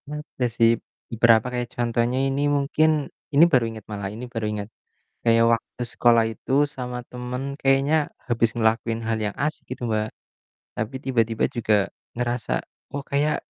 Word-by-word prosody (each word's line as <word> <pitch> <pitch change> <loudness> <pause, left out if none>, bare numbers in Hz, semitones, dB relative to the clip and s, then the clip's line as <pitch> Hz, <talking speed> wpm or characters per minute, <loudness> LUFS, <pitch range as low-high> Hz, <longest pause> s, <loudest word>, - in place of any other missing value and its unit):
Pernah 150 +1 -6
ada 125 - 0
sih, 115 -1 +6 0.5
berapa 115 -2 +6
kayak 120 -1 -2
contohnya 120 +1 +1
ini 135 +1 0 0.2
mungkin 155 +3 +2 0.4
ini 150 +4 +8
baru 125 -5 +4
inget 110 -2 -9
malah, 100 -2 -3
ini 110 +5 -7
baru 115 -2 -2
inget. 105 -1 -4 0.5
Kayak 115 0 +5
waktu 115 +1 -3
sekolah 115 -1 +5
itu 115 - -5 0.2
sama 125 -1 -4
temen, 125 +1 -5 0.2
kayaknya 135 +3 +3 0.3
habis 115 -1 +2
ngelakuin 115 0 +1
hal 110 0 -1
yang 105 - -3
asik 155 +1 -2
gitu, - - -26
Mbak. 110 0 +1 0.7
Tapi 110 +4 -3
tiba-tiba 115 -4 +1
juga 110 -2 +2 0.4
ngerasa, 120 - -1 0.4
"Oh, 140 - -4
kayak 145 +2 +2
120 Hz, 155 wpm, -24 LUFS, 115-130 Hz, 0.7 s, ini